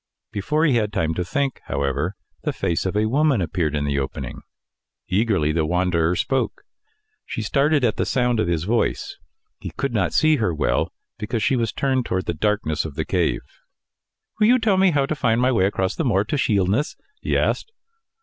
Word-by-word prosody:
Before 150 +11 0
he 135 -7 +3
had 105 -2 0
time 80 -6 0
to 90 - -2
think, 135 +9 -2
however, 70 +7 -1 0.3
the - - -1
face 85 +2 -1
of 95 - -1
a 105 - +2
woman 140 +2 +2
appeared 80 -3 -1
in 75 0 -1
the 70 0 0
opening. 65 - -5 0.7
Eagerly 95 -6 +1
the 80 0 +1
wanderer 90 0 +1
spoke. 135 +7 -1 0.6
She 110 - -5
started 140 +5 +2
at 115 -3 +1
the - - +1
sound 125 -3 +1
of 85 - +1
his 85 -2 0
voice. 115 +5 -1 0.4
He - - -6
could - - -3
not - - +1
see 155 -1 +4
her 110 - 0
well, - - 0 0.3
because 110 +1 -2
she 135 - +2
was 115 -3 0
turned 130 -3 0
towards 95 0 -1
the - - -1
darkness 85 -3 0
of 75 -3 -7
the 80 -1 -2
cave. 90 -3 0 1.0
"Will 210 - +5
you 250 +2 +6
tell 220 -5 +2
me 190 0 +5
how 145 -4 +2
to 145 - -2
find 120 -6 +1
my 125 +1 +3
way 95 -7 +3
across 95 -2 -1
the - - -1
moor 105 -8 +2
to 110 - -3
Shielness?" 105 +1 +1 0.3
he - - 0
asked. 450 - 0
105 Hz, 195 wpm, -22 LUFS, 85-135 Hz, 1.0 s, you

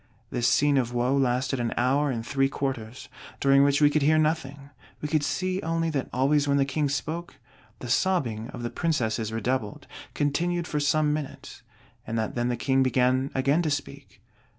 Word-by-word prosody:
This 120 -1 0
scene 145 0 +3
of 120 -1 -2
woe 125 +3 +1
lasted 130 0 0
an 120 -1 -2
hour 135 +4 +2
and 115 -3 -3
three 135 +1 +1
quarters; 130 -3 -4 0.3
during 140 0 +5
which 140 +1 +2
we 145 - +6
could 155 - +1
hear 155 +3 +4
nothing; 145 -3 -1 0.3
we 150 - -3
could 155 0 +1
see 185 +5 -1
only 165 0 -1
that 140 -4 -2
always 145 +3 +2
when 140 0 +2
the 135 - +3
King 145 +1 -1
spoke, 160 +5 -4 0.4
the 125 - -8
sobbing 120 -6 0
of 120 - -8
the 120 - -3
Princesses 115 -9 -1
redoubled, 115 -1 -2 0.3
continued 170 +4 0
for 150 - -2
some 150 +1 +2
minutes; 150 -3 -6 0.5
and 115 +1 -2
that 110 -1 -2
then 120 0 -1
the 120 - -1
King 135 +2 +1
began 130 +1 +2
again 140 +5 +2
to 160 - -1
speak." 140 -4 -5
140 Hz, 185 wpm, -26 LUFS, 125-150 Hz, 0.5 s, we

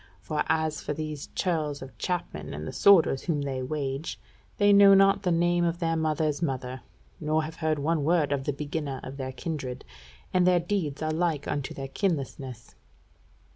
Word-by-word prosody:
For 150 +11 -2
as 160 -1 0
for - - -3
these 155 -2 -5
churls 155 -6 -1
of 135 - -11
chapmen, 160 - -3
and 75 +1 -6
the - - -4
sworders 175 -9 +5
whom 150 -5 0
they 135 -2 -3
wage, 135 +2 -3 0.4
they 205 0 +5
know 200 0 +8
not 195 0 +5
the 180 - 0
name 175 +1 +2
of 170 0 0
their 165 -2 0
mother's 155 -1 0
mother, 130 -4 -3 0.4
nor 155 +1 +1
have 160 +2 -7
heard 155 -2 0
one 155 +1 0
word 160 -2 +2
of 135 -1 -1
the - - +1
beginner 145 -1 -4
of 135 +1 -7
their 130 -1 -4
kindred; 135 -3 -5 0.5
and 180 -1 +4
their 180 -1 +5
deeds 170 -5 -2
are 155 - 0
like 160 -3 0
unto 145 -2 -3
their 135 0 -5
kinlessness." 135 - -3
155 Hz, 180 wpm, -27 LUFS, 140-170 Hz, 0.5 s, know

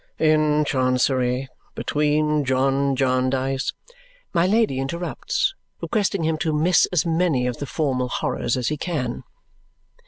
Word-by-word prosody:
"'In 155 -1 +3
Chancery. 130 -1 +1 0.3
Between 150 0 +1
John 135 +1 +1
Jarndyce 130 +1 0 0.3
'" - - -32
My 170 0 +3
Lady 215 - +2
interrupts, 170 - -2 0.3
requesting 200 -5 -1
him 160 0 0
to 160 - 0
miss 160 +4 +3
as 180 -1 +1
many 165 -6 +1
of 125 -1 -2
the 145 - -5
formal 130 -4 -1
horrors 120 0 -1
as 125 - -1
he 150 - -2
can. 140 -8 -3
145 Hz, 130 wpm, -23 LUFS, 130-165 Hz, 0.3 s, In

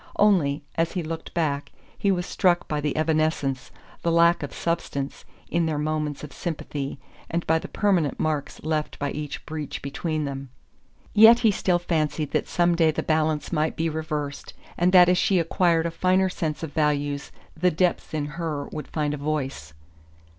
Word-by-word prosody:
Only, 165 -9 +3 0.2
as 165 0 +1
he 180 - -2
looked 160 +1 -6
back, 145 -4 -1 0.2
he 200 - 0
was 180 -2 0
struck 175 -2 +2
by 150 -1 -1
the 150 0 -1
evanescence, 155 -4 0 0.3
the 170 - +1
lack 170 +1 +4
of 145 - -5
substance, 140 -5 -3 0.3
in 170 -1 +2
their 155 -2 -1
moments 150 -1 -2
of 150 - -8
sympathy, 145 -5 -4 0.3
and 170 +1 -2
by 160 0 +3
the - - -7
permanent 185 -8 +1
marks 155 -2 -2
left 155 -1 -2
by 145 -1 -2
each 150 -1 -5
breach 155 -2 -5
between 155 +2 -2
them. 135 -1 -5 0.6
Yet 225 +2 +9
he 225 -3 +5
still 185 -2 +1
fancied 155 -3 -1
that - - 0
some 175 0 +2
day 165 -2 +4
the 155 - -1
balance 155 -1 0
might 155 0 +1
be 165 0 0
reversed, 155 -2 -4 0.2
and 175 +1 +2
that 180 -1 +8
as 180 0 +3
she 195 - +3
acquired 170 0 +2
a 170 - -1
finer 185 +2 +2
sense 160 -3 -3
of 155 -3 -5
values 145 -2 0 0.2
the 180 +3 +3
depths 180 +1 0
in 150 -2 -1
her 150 -2 -4
would 150 - -6
find 150 -2 -1
a - - -3
voice. 135 - -3
155 Hz, 180 wpm, -25 LUFS, 150-170 Hz, 0.6 s, Yet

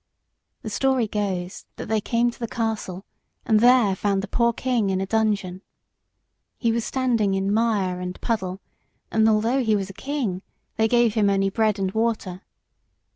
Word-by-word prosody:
The 220 - -5
story 260 +1 +1
goes, 190 -4 -3
that - - -7
they 220 -1 0
came 235 +2 +1
to - - -17
the 235 - -3
castle 215 -5 -3 0.4
and 220 -3 +4
there 240 -4 +5
found 195 0 0
the - - -4
poor 235 +3 +2
king 235 -4 0
in 190 -1 0
a 195 - -1
dungeon. 200 -3 0 1.0
He 230 -2 +1
was 230 0 -1
standing 230 -7 0
in 195 +1 0
mire 205 -5 +1
and 180 0 -6
puddle, 190 -4 -2 0.5
and, 220 0 +4
although 230 +5 +2
he 220 -2 +2
was 195 -1 -3
a - - -15
king, 215 -4 -3 0.3
they 220 0 +2
gave 240 -1 +3
him 210 -3 +2
only 195 0 +1
bread 215 0 +1
and 190 -1 -1
water. 215 -4 -2
215 Hz, 175 wpm, -24 LUFS, 195-230 Hz, 1.0 s, there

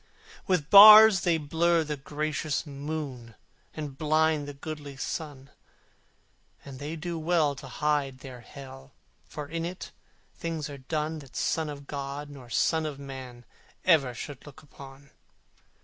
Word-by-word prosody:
With 175 -6 0
bars 215 0 +10
they 170 -3 +2
blur 165 +2 +1
the 150 -1 -4
gracious 150 +2 -3
moon, 140 -5 -6 0.4
And 145 -3 -7
blind 155 -1 +1
the 145 - -7
goodly 145 -1 -8
sun: 140 -1 -6 1.1
And 135 -2 -10
they 150 +3 -5
do 165 +1 -5
well 160 -3 +1
to 135 - -9
hide 145 -1 -1
their 130 -2 -10
Hell, 135 +2 -12 0.3
For 150 -1 -8
in 165 +2 -4
it 175 +2 -6 0.4
things 160 -3 -5
are 140 - -9
done 155 +3 -3
That 135 -4 -15
Son 160 -2 -1
of 140 -1 -8
God 140 +1 -6
nor 130 -4 -12
son 160 +6 +1
of 145 -3 -6
Man 130 -3 -9 0.4
Ever 140 -9 +3
should 140 +2 -8
look 145 +2 -14
upon! 140 -1 -14
145 Hz, 145 wpm, -27 LUFS, 135-160 Hz, 1.1 s, bars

